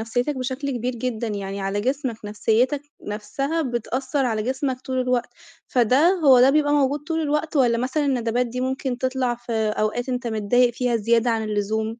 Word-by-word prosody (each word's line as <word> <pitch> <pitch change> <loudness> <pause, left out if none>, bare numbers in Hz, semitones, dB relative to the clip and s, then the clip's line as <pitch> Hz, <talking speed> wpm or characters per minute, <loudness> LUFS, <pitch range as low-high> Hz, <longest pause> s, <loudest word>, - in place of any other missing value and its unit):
نفسيتك 245 +6 -1
بشكل 260 +2 -3
كبير 250 0 -2
جدًا، 235 -1 -3
يعني 200 -1 -4
على 195 +1 -1
جسمك 260 0 -1
نفسيتك 225 +7 +1 0.3
نَفسها 275 +10 -2
بتأثر 255 +2 -1
على 220 -3 -1
جسمك 260 +2 -2
طول 260 0 -2
الوقت، 250 -1 0 0.4
فده 255 +6 +3 0.2
هو 260 -3 +7
ده 260 +2 +7
بيبقى 290 0 +2
موجود 290 0 +2
طول 320 +2 -2
الوقت 300 +1 -1
والّا 240 -3 +3
مثلًا 260 +5 0
الندبات 245 -2 0
دي 245 +2 -5
ممكن 260 -1 -2
تطلع 255 -1 0
في 240 0 -8
أوقات 220 +2 -1
أنت 250 -1 -2
متضايق 235 +2 +2
فيها 245 -1 0
زيادة 230 +2 +2
عن 225 -1 0
اللزوم؟ 215 +1 -1
245 Hz, 175 wpm, -23 LUFS, 225-265 Hz, 0.4 s, هو